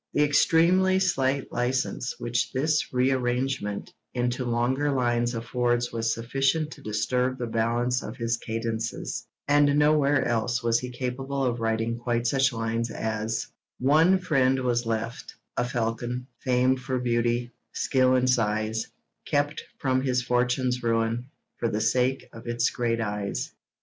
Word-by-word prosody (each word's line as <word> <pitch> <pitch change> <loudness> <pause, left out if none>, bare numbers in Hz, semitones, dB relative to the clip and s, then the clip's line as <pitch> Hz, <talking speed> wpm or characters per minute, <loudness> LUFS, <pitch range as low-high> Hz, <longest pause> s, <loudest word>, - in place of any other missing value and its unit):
The 150 - +4
extremely 170 +6 +4
slight 140 -7 0
licence 125 +1 -1
which 120 0 -1
this 155 +4 +1
rearrangement 125 -3 0 0.2
into 125 +1 0
longer 125 +5 +1
lines 120 -2 +1
affords 120 +1 0
was 115 0 0
sufficient 135 +7 0
to - - -11
disturb 125 +4 0
the 125 - -3
balance 120 +2 0
of 110 +4 -7
his 115 -1 0
cadences, 115 0 -4 0.2
and 145 0 +4
nowhere 150 -2 +3
else 120 +1 0
was 115 0 +3
he 125 - -5
capable 130 +2 -3
of 120 -1 -1
writing 115 +1 -1
quite 120 0 -1
such 135 +2 +3
lines 115 0 -2
as: 110 0 -2 0.3
One 155 +8 +4
friend 135 -7 +2
was 120 -2 0
left, 115 +1 -3 0.2
a - - +1
falcon, 120 +1 -2
famed 130 0 +2
for 130 0 -2
beauty, 120 0 0 0.2
skill 130 -1 +2
and 130 0 +2
size, 110 -2 +1 0.4
Kept 145 +1 0
from 130 -1 +1
his 125 -1 0
fortune's 125 0 +1
ruin, 115 +1 0 0.3
for 115 - 0
the 105 - -1
sake 125 +4 +1
of 115 +1 -11
its 120 0 +1
great 115 -2 -1
eyes. 105 -2 -3
125 Hz, 140 wpm, -26 LUFS, 115-130 Hz, 0.4 s, The